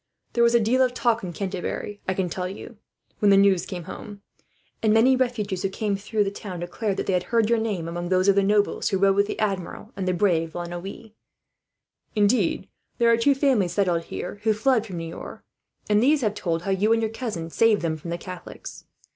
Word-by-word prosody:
"There 235 - +3
was 235 0 +4
a - - +6
deal 235 +4 +2
of 250 -1 +2
talk 235 -2 +1
in 180 - -4
Canterbury, 195 +3 -4
I 185 - 0
can 190 -1 0
tell 180 +1 -3
you, 205 +3 -10 0.4
when 205 - +4
the 195 - +6
news 195 -2 +4
came 180 -3 -6
home; 205 +3 -9 0.6
and 220 - +3
many 235 +4 +5
refugees 220 -7 -1
who 195 - 0
came 205 +1 -1
through 210 +2 -1
the 195 - -2
town 190 -4 -7
declared 195 +3 -3
that - - -2
they 190 - 0
had 180 -1 0
heard 230 -1 +2
your 235 - +3
name 205 -7 -2
among 175 +1 -4
those 185 +1 +2
of 200 - +6
the 200 - +3
nobles 205 +1 +1
who 195 - +1
rode 195 0 +3
with 200 0 +3
the - - -4
Admiral, 200 +1 -3
and 190 -1 -3
the 185 - +2
brave 165 -4 +1
La 175 - -3
Noue. 185 +5 -8 1.0
Indeed, 205 -3 +2 0.3
there 235 -1 +4
are - - +6
two 275 +4 +3
families 255 - +2
settled 175 -4 +1
here 205 - -6
who 220 0 +2
fled 230 0 +2
from 185 -4 -6
Niort, 165 0 -7 0.4
and 210 0 +3
these 285 +4 +3
have 215 -4 +1
told 170 -5 -2
how 195 - -1
you 200 +3 +2
and 230 - +1
your 220 - -1
cousin 210 -9 -5
saved 220 -2 +3
them 160 -1 0
from 155 +2 -8
the 170 - -2
Catholics. 180 0 -9
200 Hz, 225 wpm, -24 LUFS, 180-225 Hz, 1.0 s, a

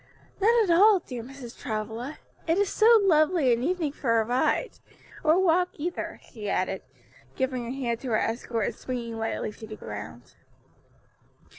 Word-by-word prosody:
"Not 460 +3 +5
at 370 - +1
all, 410 +3 +7
dear 245 -3 -6
Mrs. 250 0 -10
Travilla; 225 +3 -5 0.3
it 330 +2 +2
is 400 -1 +2
so 450 +1 +6
lovely 310 -6 +4
an 235 - -1
evening 325 0 0
for 230 -5 +1
a 220 - +1
ride; 250 - 0 0.4
or 315 +2 +4
walk 360 0 +3
either," 345 +4 -4
she 210 -4 -5
added, 185 0 -1 0.5
giving 255 -2 -1
her - - -6
hand 245 -3 -2
to 260 - -7
her 225 -3 +2
escort 225 -1 -1
and - - -2
springing 235 -3 -5
lightly 225 -1 -2
to 220 +1 -11
the 215 - -7
ground. 110 - -9
255 Hz, 165 wpm, -27 LUFS, 230-340 Hz, 0.5 s, all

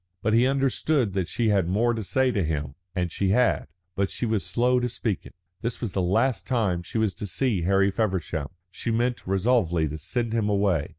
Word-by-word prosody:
But 110 - +2
he 120 +3 +5
understood 135 -3 +1
that 95 -3 -1
she 115 +3 0
had 100 -5 +2
more 115 +6 +2
to 110 -1 -3
say 130 +6 +2
to 100 -5 0
him. 75 -3 -2 0.2
And 90 -2 -1
she 95 +2 0
had. 120 -1 +2 0.3
But 100 0 0
she - - -3
was 110 -5 0
slow 120 +8 +2
to 125 0 -1
speak 110 -4 -3
it. - - -17 0.3
This 115 +1 -3
was 115 -6 -3
the 95 - 0
last 110 +8 +1
time 105 -9 +1
she 85 - -5
was 110 -3 +1
to 105 - -6
see 95 +3 0
Harry 100 +1 +3
Feversham; 95 -8 -1 0.2
she 115 - -4
meant 120 0 0
resolutely 95 -5 +2
to 75 +2 -6
send 115 - -2
him 110 -2 +1
away. 100 -7 +1
105 Hz, 215 wpm, -26 LUFS, 90-120 Hz, 0.3 s, he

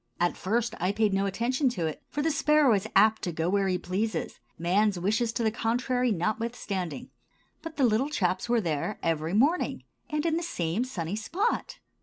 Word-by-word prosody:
At 175 0 +1
first 230 +4 -1
I 180 +3 +1
paid 210 -1 +1
no 195 +1 +1
attention 250 +7 +1
to 170 - 0
it, 155 - -4
for 295 - -2
the 320 - +2
sparrow 300 -4 +4
is 200 +1 0
apt 215 +2 +5
to 175 - -2
go 165 +1 -1
where 200 -1 +2
he 185 -1 +1
pleases, 195 +5 -3 0.2
man's 190 +4 +2
wishes 220 +6 +1
to 235 - -1
the 220 - +2
contrary 245 +2 0
notwithstanding. 200 - -3 0.5
But 325 -1 -8
the 280 - +2
little 235 +5 +2
chaps 185 -6 -1
were 240 -1 +3
there 165 +4 -2
every 165 +2 0
morning, 295 +11 +2 0.3
and 300 +1 -1
in 325 -1 +2
the - - -1
same 195 - -1
sunny 180 -7 -4
spot. 370 - -1
215 Hz, 190 wpm, -28 LUFS, 185-250 Hz, 0.5 s, apt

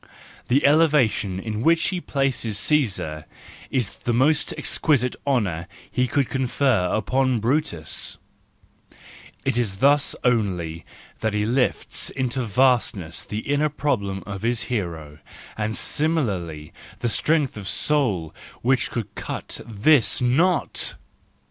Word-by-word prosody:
The 135 +4 +3
elevation 140 - +3
in 110 +1 -4
which 165 +4 +3
he 180 -2 -3
places 135 -8 -1
Caesar 100 - 0 0.4
is 125 -6 -1
the 120 - -1
most 150 +5 +2
exquisite 125 -5 +1
honour 95 -11 0 0.2
he 125 0 +1
could 135 +1 +1
confer 130 -6 +1
upon 130 +2 +1
Brutus; 115 - -1 1.3
it 120 - +1
is 100 -5 -1
thus 140 +5 +3
only 90 - 0 0.3
that 110 -1 -1
he 105 0 +1
lifts 125 +3 +1
into 130 0 -2
vastness 115 -7 +1
the 105 +1 -4
inner 145 +3 +1
problem 100 -10 -2
of 100 -2 -6
his 115 +1 0
hero, 80 -8 -4 0.4
and 110 0 -2
similarly 100 - -1 0.3
the - - +1
strength 150 +4 +1
of 100 -3 -7
soul 105 - 0 0.3
which 125 -1 +2
could 115 -4 -5
cut - - -6
this 115 +4 +3
knot 155 +8 +1
120 Hz, 120 wpm, -23 LUFS, 100-140 Hz, 1.3 s, The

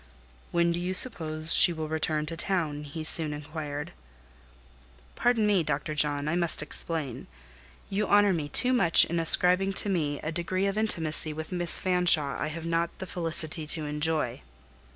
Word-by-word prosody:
"When 170 0 0
do 170 - -3
you 180 +1 -3
suppose 160 -8 +3
she 180 - +6
will 160 -2 -6
return 155 -1 -2
to 165 - -6
town?" 160 -5 -3
he 155 +2 -8
soon 155 -1 +2
inquired. 150 0 -7 1.2
"Pardon 240 -3 0
me, 205 -3 +1
Dr. 150 0 -4
John, 145 -1 0
I 160 - -2
must 170 -3 -1
explain. 150 -4 -3 0.6
You 205 +2 -3
honour 205 -1 +3
me 150 -4 -5
too 250 - +2
much 195 -10 +6
in 170 0 -4
ascribing 180 +4 +3
to 205 - -1
me 150 -6 -2
a 155 - -5
degree 180 +3 -3
of 200 0 -2
intimacy 160 -8 +2
with 160 +3 -9
Miss 175 -1 +2
Fanshawe 175 -7 +1
I 155 - -2
have 160 +2 -8
not 165 0 -3
the 190 - -8
felicity 165 -3 -1
to 155 0 -3
enjoy. 150 -4 -3
165 Hz, 170 wpm, -26 LUFS, 150-180 Hz, 1.2 s, she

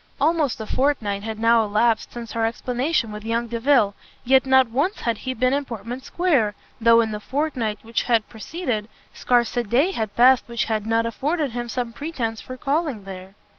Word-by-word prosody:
Almost 300 -3 +1
a 220 - -4
fortnight 220 -6 0
had 220 +1 -5
now 230 0 +4
elapsed 220 +2 +1
since 235 -1 -8
her 230 - -1
explanation 245 +2 -1
with 210 0 -7
young 230 +1 -1
Delvile, 235 -2 +2 0.3
yet 265 +1 +4
not 265 -1 +5
once 295 - 0
had 230 -3 -1
he 260 0 -4
been 255 +2 +2
in 285 +1 +1
Portman 240 0 -6
square, 270 - +1 0.2
though 230 0 +6
in 220 -1 -1
the 210 - -4
fortnight 255 -4 -2
which 225 0 -1
had 230 -3 +1
preceded, 230 -2 -4 0.2
scarce 245 -1 +1
a 240 - +2
day 255 - +2
had 220 - -4
passed 255 +1 +5
which 235 -1 -1
had 220 -1 -2
not 225 0 +2
afforded 285 +5 -1
him 240 0 -4
some 240 -1 -3
pretence 240 -6 -4
for 255 - -8
calling 280 - -1
there. 190 0 -10
235 Hz, 190 wpm, -23 LUFS, 220-265 Hz, 0.3 s, though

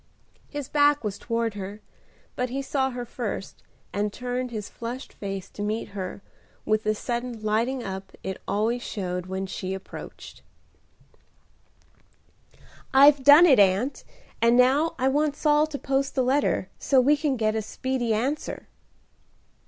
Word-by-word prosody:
His 290 -3 -5
back 290 -1 +3
was 205 -2 -3
toward 230 -1 -1
her, 200 +1 -7 0.6
but 250 0 -1
he 270 +3 -3
saw 265 -1 0
her 245 -1 -5
first, 225 -4 -5 0.3
and 205 +1 -1
turned 250 +2 -3
his 215 -3 -5
flushed 240 +3 -7
face 195 -1 -5
to - - -8
meet 210 +2 -2
her, 195 -1 -6 0.4
with 215 0 +2
the 215 0 0
sudden 240 0 -4
lighting 230 +4 0
up 190 -1 -6
it 190 0 -5
always 225 +4 0
showed 180 -5 -4
when 190 +1 -3
she 190 0 -4
approached. 190 - -10 2.5
"I've 275 +1 +7
done 290 +5 +9
it, 270 -10 +6
Aunt; 200 +7 +2 0.4
and 235 +1 +5
now 275 +6 +4
I 260 0 +1
want 290 +2 +1
Saul 300 0 +3
to 305 -2 -5
post 275 0 -1
the 260 - +2
letter, 260 -6 +1
so 270 - +3
we 280 +4 +5
can 290 -3 -1
get 215 -1 +1
a 220 - -1
speedy 250 +2 -2
answer." 260 +8 -2
240 Hz, 150 wpm, -26 LUFS, 210-270 Hz, 2.5 s, done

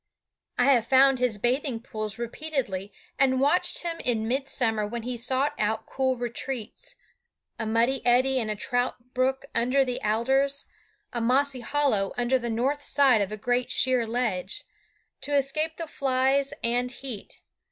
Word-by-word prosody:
I 245 - +3
have 235 -2 +1
found 270 0 +5
his 245 -4 +1
bathing 245 +2 0
pools 215 -2 -5
repeatedly, 235 -6 -3 0.3
and 260 -1 +3
watched 290 +8 +2
him 335 -1 -3
in 225 -3 0
midsummer 240 -4 0
when 235 +1 -5
he 250 +1 -3
sought 260 +4 0
out 215 +1 0
cool 260 -1 -1
retreats 250 - -5 0.6
a 225 - -2
muddy 235 +4 +1
eddy 255 +2 +3
in 220 -3 -2
a 215 - -1
trout 245 +2 -2
brook 265 +1 0
under 255 +3 +2
the 250 -1 -3
alders, 265 +6 +1 0.5
a 235 - -1
mossy 260 +3 +2
hollow 240 -6 +1
under 245 +2 +2
the 240 -1 -4
north 265 +6 -1
side 270 -7 +4
of 200 0 -2
a 215 - -4
great 245 +3 0
sheer 255 -2 +2
ledge 220 -6 -2 0.6
to 290 - -1
escape 305 +4 0
the 330 - -4
flies 270 -1 +1
and 245 +2 +1
heat. 245 -4 -9
250 Hz, 155 wpm, -26 LUFS, 230-270 Hz, 0.6 s, found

